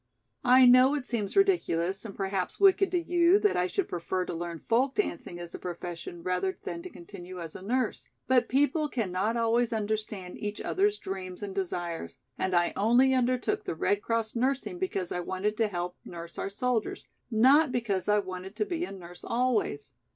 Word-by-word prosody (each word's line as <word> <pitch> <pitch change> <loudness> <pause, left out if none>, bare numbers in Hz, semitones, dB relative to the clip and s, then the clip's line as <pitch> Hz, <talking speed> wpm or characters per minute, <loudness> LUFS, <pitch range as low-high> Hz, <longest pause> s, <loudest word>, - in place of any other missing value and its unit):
I 255 0 +7
know 255 +3 +7
it 280 -4 -3
seems 220 -5 -2
ridiculous 195 - +2
and 200 - -7
perhaps 190 -2 -2
wicked 390 0 +5
to 360 - +1
you 345 +2 +4
that 415 -1 +2
I 180 - +2
should 390 - -1
prefer 180 +1 -2
to - - -5
learn 170 -1 -5
folk 255 +4 +2
dancing 175 - -2
as 175 0 -8
a - - -6
profession 175 -1 -6
rather 185 +1 -1
than 170 -1 -5
to - - -8
continue 180 +1 -10
as 165 -2 -7
a - - -8
nurse. 240 +4 -2 0.2
But 255 -1 +3
people 290 +3 +2
cannot 215 -1 -1
always 230 +1 +2
understand 215 -4 -3
each 205 0 -4
other's 410 +2 +1
dreams 185 - -6
and 200 -1 -5
desires 175 - -4 0.2
and 185 -1 0
I 175 0 +2
only 245 +5 +4
undertook 255 - +1
the - - -4
Red 205 +5 +1
Cross 230 0 -1
nursing 270 +8 -1
because 195 - -2
I 180 - -1
wanted 190 +4 -2
to 225 - +2
help 180 -2 -4
nurse 170 -1 -9
our - - -2
soldiers, 230 +2 -2 0.2
not 260 +6 +5
because 220 -6 -1
I 210 - +5
wanted 185 0 -5
to 210 -1 0
be 345 +5 -2
a - - -9
nurse 175 -2 -10
always. 230 - 0
210 Hz, 190 wpm, -29 LUFS, 180-255 Hz, 0.2 s, I